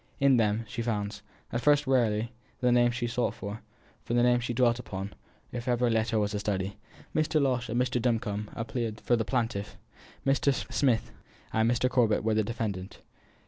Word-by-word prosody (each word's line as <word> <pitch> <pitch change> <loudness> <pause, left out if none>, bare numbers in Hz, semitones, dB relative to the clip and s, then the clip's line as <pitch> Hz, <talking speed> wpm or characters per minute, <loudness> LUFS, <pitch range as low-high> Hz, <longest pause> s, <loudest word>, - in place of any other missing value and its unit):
In 135 -2 +5
them 110 0 +1
she 115 - -4
found 105 -3 -2 0.3
at 120 - 0
first 145 +2 +4
rarely 115 -4 +2 0.3
the 125 -1 +3
name 120 0 +5
she 120 0 -2
sought 120 +1 -1
for, 100 +3 -6 0.5
the 120 - 0
name 120 0 +4
she 120 0 -3
dwelt 120 0 +3
upon, 95 -4 -5 0.4
as - - -3
if 120 - -9
every 120 -1 +2
letter 110 0 +1
were 105 - +3
a 105 0 -2
study. 100 -1 -2 0.4
Mr. 155 0 +2
Losh 125 -4 +1
and 120 +2 0
Mr. 125 -1 +1
Duncombe 110 -3 -1
appeared 115 -1 -3
for 120 - +2
the 115 - 0
plaintiff, 115 -5 -2 0.5
Mr. 140 +1 +3 0.2
Smythe 125 -5 +2 0.5
and 110 +1 +3
Mr. 120 +1 +2
Corbet 120 -5 +2
for 110 0 +2
the 110 0 +2
defendant. 100 -4 -4
115 Hz, 185 wpm, -29 LUFS, 110-125 Hz, 0.5 s, In